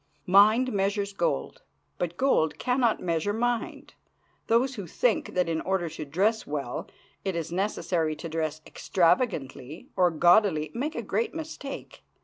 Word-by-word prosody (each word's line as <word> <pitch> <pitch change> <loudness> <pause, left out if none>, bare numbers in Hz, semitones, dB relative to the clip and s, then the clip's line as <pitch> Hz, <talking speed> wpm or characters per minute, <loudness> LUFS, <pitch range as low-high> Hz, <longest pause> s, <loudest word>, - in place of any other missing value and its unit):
Mind 215 +7 +5
measures 200 0 0
gold, 170 - -2 0.4
but 175 -1 -2
gold 175 - +2
can 250 +1 0
not 235 -4 +2
measure 170 +3 0
mind. 240 +1 -2 0.5
Those 245 +4 +2
who 200 -7 -6
think 230 +7 0
that 180 -1 +2
in 160 -1 -1
order 185 -3 -1
to 155 -1 -7
dress 200 +10 0
well 140 -4 -4 0.4
it 190 -2 -2
is 165 -1 -3
necessary 175 -4 -1
to 165 - -7
dress 155 -1 -3
extravagantly 160 - 0
or 180 -1 +4
gaudily 175 -2 +3
make 290 +6 -3
a - - -3
great 460 -6 -1
mistake. 315 -3 -7
185 Hz, 145 wpm, -27 LUFS, 160-225 Hz, 0.5 s, Mind